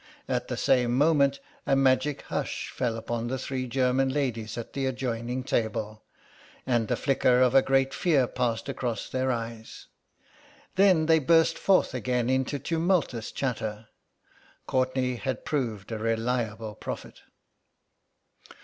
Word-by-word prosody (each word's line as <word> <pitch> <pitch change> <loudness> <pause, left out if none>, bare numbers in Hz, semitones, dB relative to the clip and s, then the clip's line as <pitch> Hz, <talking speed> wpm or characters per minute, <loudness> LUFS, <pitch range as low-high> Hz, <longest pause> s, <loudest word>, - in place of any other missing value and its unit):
At - - -1
the - - -4
same 125 -1 +2
moment 140 -2 +3 0.3
a 135 - +4
magic 135 +2 +2
hush - - -4
fell 120 -3 -2
upon 115 +1 -3
the 130 +2 -2
three 130 0 -4
German 130 +1 +1
ladies 125 -6 -2
at 115 - -6
the 135 -1 -1
adjoining 125 -1 -3
table, 110 -3 -2 0.6
and 120 -3 +1
the - - +1
flicker 130 -2 +2
of 125 -1 +4
a 135 - +7
great 135 0 +2
fear 150 -8 +2
passed 120 -1 -2
across 125 -4 -3
their 130 0 0
eyes. 115 -1 -6 0.9
Then 185 -5 +4
they 160 0 +5
burst 165 +3 +4
forth 195 -2 +2
again 125 0 0
into 130 +2 0
tumultuous 160 - 0
chatter. 110 -4 -3 0.8
Courtenay 130 -1 0
had 130 +1 -4
proved 115 -9 -2
a 110 - -3
reliable 115 -1 -1
prophet. - - -7
130 Hz, 135 wpm, -27 LUFS, 115-135 Hz, 0.9 s, a